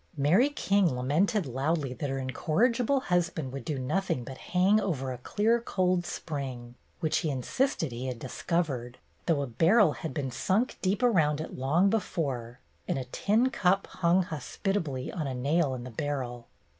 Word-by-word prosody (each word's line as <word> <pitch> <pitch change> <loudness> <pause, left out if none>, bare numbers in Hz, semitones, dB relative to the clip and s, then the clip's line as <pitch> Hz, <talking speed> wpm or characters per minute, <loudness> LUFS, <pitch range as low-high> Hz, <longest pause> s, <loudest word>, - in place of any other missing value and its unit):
Mary 175 - +4
King 195 - +2
lamented 160 - +1
loudly 135 +2 -1
that 140 +3 -4
her 135 - -2
incor 155 - +1
rigible 255 +2 0
husband 170 -6 0
would 135 - -5
do 150 -4 -3
nothing 140 +1 -1
but 130 +2 -9
hang 190 +4 +3
over 135 -10 -2
a 125 - -8
clear 220 - +1
cold 185 -5 0
spring, 130 -8 -5 0.3
which 155 -3 +1
he 160 - -1
insisted 155 - 0
he 120 +2 -4
had 125 -2 -3
discovered, 130 -2 -2 0.3
though 155 -5 +2
a - - -1
barrel 165 - +4
had 160 - -5
been 140 -4 -3
sunk 195 - 0
deep 195 +5 0
around 160 -11 +3
it 155 - -6
long 150 +9 +2
before, 140 - -2 0.3
and - - 0
a 130 - -3
tin 230 +6 +2
cup 190 -1 +2
hung 180 +1 +2
hospitably 160 -4 -3
on 155 -5 -2
a 130 - -3
nail 140 +2 +1
in 120 - -6
the 125 - -8
barrel. 125 -2 -4
155 Hz, 170 wpm, -29 LUFS, 130-190 Hz, 0.3 s, Mary